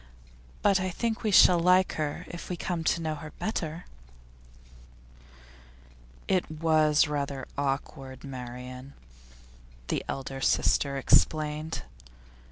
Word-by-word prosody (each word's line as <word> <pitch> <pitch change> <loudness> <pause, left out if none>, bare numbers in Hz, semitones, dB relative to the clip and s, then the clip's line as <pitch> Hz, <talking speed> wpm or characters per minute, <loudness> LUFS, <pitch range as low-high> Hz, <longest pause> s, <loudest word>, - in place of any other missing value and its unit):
But 200 -2 +4
I 185 0 -1
think 225 +5 -2
we 215 - 0
shall 180 -3 +7
like 180 +2 +4
her 150 -2 -3
if 170 - -8
we 180 - -3
come 170 -1 -3
to 170 - +1
know 155 -1 -1
her 155 0 -9
better.' 170 -6 -3 2.4
'It 185 -4 +1
was 155 -1 +3
rather 140 -2 -3
awkward, 135 -1 -4
Marian,' 125 0 -8 1.0
the - - -1
elder 135 0 -5
sister 140 +1 +2
explained. 155 +3 +2
155 Hz, 110 wpm, -28 LUFS, 135-175 Hz, 2.4 s, shall